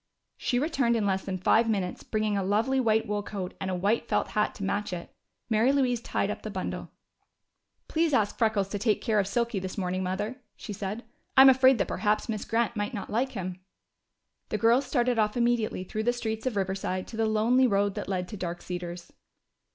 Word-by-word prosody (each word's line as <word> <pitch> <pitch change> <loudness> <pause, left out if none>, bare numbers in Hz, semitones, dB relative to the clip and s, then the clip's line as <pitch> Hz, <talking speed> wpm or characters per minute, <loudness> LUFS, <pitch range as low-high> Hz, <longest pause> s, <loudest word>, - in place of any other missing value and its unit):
She 245 - 0
returned 270 -4 +1
in 220 -3 +1
less 190 -1 0
than 190 -1 -2
five 225 +5 +3
minutes 190 -4 -1
bringing 215 -1 -1
a 200 - +1
lovely 220 +7 +1
white 220 -3 +2
wool 205 0 -1
coat 195 -3 -5
and 190 - -2
a 185 - -1
white 205 +6 0
felt - - 0
hat 210 0 0
to 200 - -7
match 200 +1 -1
it. 170 -1 -6 0.4
Mary 230 +3 +3
Louise 255 -4 +1
tied - - -1
up - - -6
the - - -5
bundle. - - -4 1.0
"Please 325 0 +1
ask 215 -6 +2
Freckles 220 -4 +1
to 205 - -3
take 215 0 +2
care 220 -3 +1
of 195 - +1
Silky 235 0 0
this 190 +1 -6
morning, 185 -1 -1
Mother," 205 +7 -2 0.2
she 210 - -7
said. 200 +4 -4 0.3
"I'm 265 0 +10
afraid 260 0 +6
that - - 0
perhaps 210 0 0
Miss 215 -3 -3
Grant 235 +1 0
might 210 +4 -2
not 200 - -6
like 255 +5 0
him." 185 -3 -5 0.9
The 215 - -1
girls 235 +5 +3
started 245 -3 +1
off 210 +1 +1
immediately 235 -5 +1
through 215 +3 -4
the 240 +2 +1
streets 220 -1 -3
of 250 - -1
Riverside 190 -1 -2
to - - -8
the 225 0 +2
lonely 230 +4 +3
road 200 -2 +1
that - - -5
led 180 -2 -1
to 210 - -6
Dark 175 -1 -5
Cedars. 175 -1 -6
215 Hz, 210 wpm, -28 LUFS, 195-235 Hz, 1.0 s, I'm